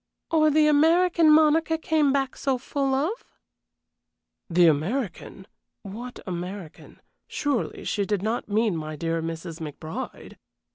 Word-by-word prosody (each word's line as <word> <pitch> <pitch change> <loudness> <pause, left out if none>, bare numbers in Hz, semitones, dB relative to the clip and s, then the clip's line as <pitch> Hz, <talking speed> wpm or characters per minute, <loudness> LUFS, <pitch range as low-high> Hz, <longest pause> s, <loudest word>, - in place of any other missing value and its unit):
"Or 310 -2 +4
the 305 +1 +4
American 325 +2 +4
Monica 315 +1 +4
came 315 -3 +1
back 270 -1 -1
so 270 -2 -1
full 270 +1 -1
of?" 325 - -2 1.3
"The 175 0 +4
American? 185 - -1 0.4
What 235 +5 -8
American? 180 -1 -7 0.3
Surely 285 -5 -2
she 200 -2 -1
did 205 -3 -1
not 220 +2 -2
mean 215 -2 +1
my 155 -1 -5
dear 165 +1 -2
Mrs. 165 0 -6
McBride?" 160 - -7
240 Hz, 125 wpm, -25 LUFS, -, 1.3 s, Or